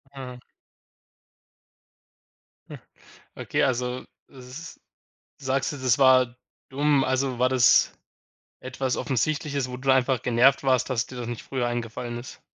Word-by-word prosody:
Mhm. 125 -2 -8 2.3
Hm, - - -9 0.6
okay, - - -1
also 125 0 -1 0.3
s 135 +4 -11 0.6
sagst 135 +1 -1
dir, 145 - -7
das 130 0 +1
war 130 -3 +4 0.3
dumm. 145 0 +2
Also 130 -1 -1
war 130 - +4
das 125 -1 +4 0.7
etwas 130 0 -3
Offensichtliches, 140 0 -1
wo 125 - -6
du 135 +1 +1
einfach 130 -2 +2
genervt 125 +4 +3
warst, 130 0 +2
dass 125 0 -1
dir 130 - -10
das 120 -1 -5
nicht 120 -2 -5
früher 125 -3 -2
eingefallen 120 0 -4
ist? 125 - -11
130 Hz, 130 wpm, -25 LUFS, 125-135 Hz, 2.3 s, war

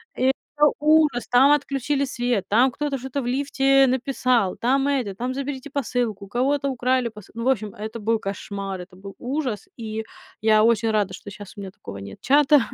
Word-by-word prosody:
И 255 - 0 0.3
это 295 0 +5
ужас. 300 -5 +3
Там 260 +3 +5
отключили 280 -1 +1
свет, 245 -6 -1
там 245 +5 +4
кто-то 290 +1 -2
что-то 265 +2 -4
в - - -6
лифте 270 +1 +3
написал, 250 -5 +1
там 270 +3 +1
это, 255 -9 -1
там 250 +5 -3
заберите 275 +1 -5
посылку, 240 -7 -2
у - - -15
кого-то 275 +5 0
украли 255 -1 +1
посылку. 210 +1 -12
Ну, - - -2
в - - +3
общем, 215 -5 0
это 220 +2 -6
был 225 +1 +1
кошмар, 195 -1 -5
это 180 +1 -13
был 195 +1 -10
ужас. 255 -5 -3
И 220 -1 -4 0.4
я 215 0 +5
очень 225 -1 +3
рада, 205 -3 0
что 205 - -10
щас 205 -2 -10
у - - -6
меня 190 -1 -7
такого 100 - -10
нет 100 0 -9
чата, 290 +2 +5
245 Hz, 195 wpm, -23 LUFS, 210-275 Hz, 0.4 s, это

